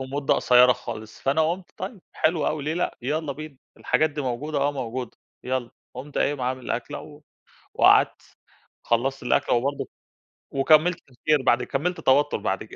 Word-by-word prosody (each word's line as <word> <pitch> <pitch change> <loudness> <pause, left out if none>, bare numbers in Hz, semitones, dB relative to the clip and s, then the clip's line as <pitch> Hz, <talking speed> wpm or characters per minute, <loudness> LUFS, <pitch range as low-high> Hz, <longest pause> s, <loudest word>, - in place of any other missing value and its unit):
ومدة 135 +2 0
قصيرة 125 0 +6
خالص، 110 -3 -8
فأنا 155 +4 +2
قُلت 180 +1 -6
طيب 190 +2 -6
حلو 160 -1 +1
أوي، 150 -2 -2
ليه 155 - -1
لأ، 175 - -2
يالّا 150 +2 -2
بينا، 155 -1 -9 0.2
الحاجات 155 0 +1
دي 145 0 -5
موجودة، 140 +4 -2
آه 140 +1 +1
موجودة، 125 -2 -5 0.3
يالّا، 125 -2 -2 0.2
قُمت 135 +4 -6
قايِم 145 -1 0
عامِل 130 0 -3
أكلة، 120 - -3
و 150 0 -13 0.5
وقعدت، - - +3 0.5
خلَّصت 125 +3 0
الأكلة، 125 - +2
وبرضه 135 +4 -1 0.6
وكمَّلت 155 +5 +4
تفكير 145 +3 +1
بعد - - +3
كمَّلت 165 +5 -2
توتُّر 140 +2 +3
بعد - - -2
كده، - - -13
140 Hz, 160 wpm, -24 LUFS, 125-155 Hz, 0.6 s, قصيرة